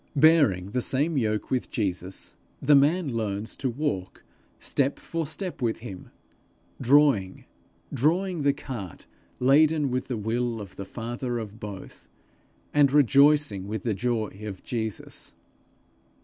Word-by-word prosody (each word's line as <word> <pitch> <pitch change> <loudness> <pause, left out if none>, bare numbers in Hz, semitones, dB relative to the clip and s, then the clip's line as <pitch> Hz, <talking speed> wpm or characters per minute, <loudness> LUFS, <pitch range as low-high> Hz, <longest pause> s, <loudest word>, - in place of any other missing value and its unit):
Bearing 140 - +4
the 125 +2 0
same 145 +7 0
yoke 110 -5 -1
with 130 -2 -1
Jesus, 95 -3 -4 0.2
the 145 +2 +4
man 145 +1 +3
learns 110 -1 -3
to 135 - -1
walk 120 -8 -3 0.3
step 140 0 0
for 165 -2 -4
step 175 0 -4
with 115 -2 -1
him, 100 -6 -9 0.7
drawing, 130 -8 +3 0.5
drawing 170 +6 +1
the 140 0 +4
cart 120 - -7 0.3
laden 145 +2 +4
with 130 0 -2
the 125 - -3
will 115 +2 -1
of 100 -3 -9
the 100 - -6
father 120 +3 -4
of 110 -1 -7
both, 100 -3 -9 0.6
and 145 -2 +5
rejoicing 140 -6 +4
with 110 -1 -4
the 115 - 0
joy 110 0 -1
of 100 -3 -7
Jesus. 110 -3 -5
125 Hz, 135 wpm, -26 LUFS, 105-145 Hz, 0.7 s, and